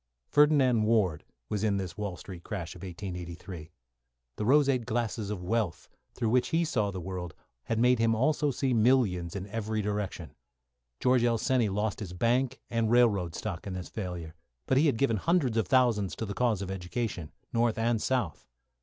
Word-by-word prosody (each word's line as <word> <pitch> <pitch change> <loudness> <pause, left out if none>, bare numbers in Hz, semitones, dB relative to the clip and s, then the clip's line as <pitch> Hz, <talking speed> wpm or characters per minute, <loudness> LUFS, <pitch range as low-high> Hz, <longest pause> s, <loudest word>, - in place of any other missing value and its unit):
Ferdinand 140 -6 +5
Ward 105 -9 +2 0.2
was 105 -1 -2
in 105 -2 +2
this 90 -3 -4
Wall 100 -4 -4
Street 90 -2 -10
crash 90 -5 -5
of - - -12
1883. 90 -3 -7 0.7
The 105 - -3
roseate 135 -2 +3
glasses 110 -2 -2
of 100 -4 -4
wealth 105 -2 -1 0.3
through 115 -3 0
which 125 0 +3
he 170 +1 +1
saw 115 -10 0
the 95 -2 -5
world 90 -1 -5 0.3
had 115 - -1
made 125 +1 +4
him 115 0 +3
also 150 +5 +2
see 135 -1 0
millions 110 -7 +2
in 95 -1 -4
every 110 +1 -3
direction. 100 -7 -3 0.7
George 125 -1 +3
L. 120 -1 +3
Seney 120 -3 +1
lost 105 +1 -1
his 95 -5 -6
bank 125 +6 +1
and 115 -2 +1
railroad 105 -8 +3
stock - - -5
in 95 - -4
this 90 -1 -6
failure, 90 -6 -5 0.3
but 130 - +3
he 155 - +4
had 135 - +1
given 115 -4 +2
hundreds 150 - +1
of 110 -5 +1
thousands 115 -6 +2
to 115 - -4
the 100 - -4
cause 110 -4 +1
of 95 - -5
education, 95 -2 -4 0.2
North 115 -1 +2
and 115 -1 +1
South. 125 - -1
110 Hz, 180 wpm, -29 LUFS, 95-125 Hz, 0.7 s, Ferdinand